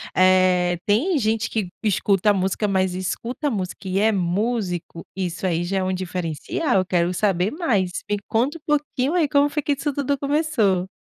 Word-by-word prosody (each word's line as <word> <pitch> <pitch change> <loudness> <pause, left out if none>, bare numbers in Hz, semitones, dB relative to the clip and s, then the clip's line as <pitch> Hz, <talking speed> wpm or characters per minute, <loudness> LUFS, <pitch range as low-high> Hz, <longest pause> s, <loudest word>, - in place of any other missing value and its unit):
eh, 185 -1 +4
tem 285 - +2
gente 220 -3 0
que 210 -5 -2
escuta 205 -1 +2
música, 195 +2 0
mas 190 -2 +1
escuta 235 - -3
música 190 -4 -4
e 190 +1 0
é 220 +2 +4
músico. 180 -2 -2
Isso 185 -1 -3
aí 170 -2 0
já 190 +3 -2
é 190 - 0
um 185 0 -1
diferencial. 185 - -1
Quero 175 -1 +1
saber 190 0 +1
mais, 225 - 0 0.2
me 205 - +1
conta 255 +8 0
um - - -22 0.2
pouquinho 285 -1 -2
aí, 340 -4 +2
como 285 +1 +3
foi 300 +1 -2
que 290 - 0
isso 285 +1 -2
tudo 280 0 -1
começou? 275 - +1
200 Hz, 175 wpm, -22 LUFS, 185-260 Hz, 0.2 s, eh